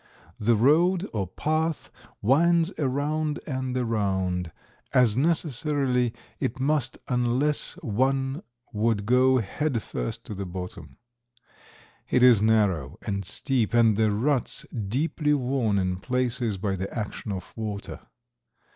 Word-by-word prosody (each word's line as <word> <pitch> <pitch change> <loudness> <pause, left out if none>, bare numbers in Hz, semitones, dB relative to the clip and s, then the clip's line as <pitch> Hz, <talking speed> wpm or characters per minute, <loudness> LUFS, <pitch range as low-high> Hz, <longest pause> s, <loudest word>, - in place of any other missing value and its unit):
The 115 +2 +3
road 170 - +3
or 100 -4 -1
path 155 - -2 0.3
winds 165 - +3
around 150 +2 -1
and 130 -3 -3
around, 95 -7 -1 0.4
as 120 -5 +4
necessarily 140 -4 +1 0.3
it 130 - -2
must 135 -2 0
unless 125 +4 0
one 135 - 0 0.3
would 105 -1 0
go 130 +3 +4
head 125 +4 -1
first - - -4
to - - -6
the 100 -1 -5
bottom. 90 -6 -8 1.1
It 125 - +3
is 120 -5 +7
narrow 105 - +2
and 100 -1 -2
steep 120 +4 -1
and 115 -3 +5
the 110 0 +3
ruts 125 +6 0
deeply 150 +8 0
worn 125 -6 0
in 90 -1 0
places 125 -1 -1
by 95 +1 -1
the 95 +1 -4
action 105 0 -4
of 95 -2 -6
water. 105 -2 -5
120 Hz, 120 wpm, -26 LUFS, 105-140 Hz, 1.1 s, is